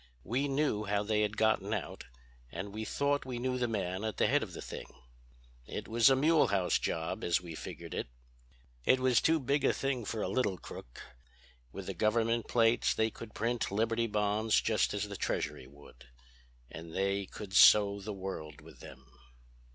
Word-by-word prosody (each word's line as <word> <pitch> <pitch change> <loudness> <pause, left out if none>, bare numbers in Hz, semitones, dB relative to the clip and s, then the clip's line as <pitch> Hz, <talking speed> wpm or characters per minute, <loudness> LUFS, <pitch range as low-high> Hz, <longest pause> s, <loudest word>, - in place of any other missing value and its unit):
We 130 +7 -1
knew 135 -7 0
how 100 0 0
they 105 0 +1
had 105 0 -1
gotten 110 -1 +2
out, 95 - -6 0.5
and 100 +1 -6
we 110 +1 -4
thought 145 +4 0
we 125 -2 -5
knew 125 +1 -1
the 120 - +1
man 95 -3 -2
at 110 -3 -3
the - - +3
head - - +3
of - - -6
the - - -7
thing. - - -7 0.8
It - - -6
was 115 +2 +5
a 135 - +5
Mulehaus 135 - +3
job, 80 0 -3
as 85 - +2
we 85 -2 -9
figured - - -8
it. - - -3 0.8
"It 130 - +4
was 130 -2 +3
too 160 0 +3
big 140 +1 0
a - - +4
thing 135 -3 -2
for 110 +1 -3
a - - -1
little 105 -8 0
crook. - - -10 0.7
With - - -7
the - - -4
government 115 +1 +1
plates 115 0 +3
they 110 0 +1
could 110 0 -11
print 120 +1 -1
Liberty 115 +3 0
Bonds 105 +1 +1
just 110 -2 +1
as 105 0 -2
the 100 - -7
Treasury 65 - -3
would. 70 -3 -16 0.7
And 80 0 -9
they 100 0 0
could 100 0 -9
sow 100 +1 +7
the 105 - -5
world 95 -6 -6
with - - -15
them." 65 -1 -12
110 Hz, 185 wpm, -32 LUFS, 100-120 Hz, 0.8 s, sow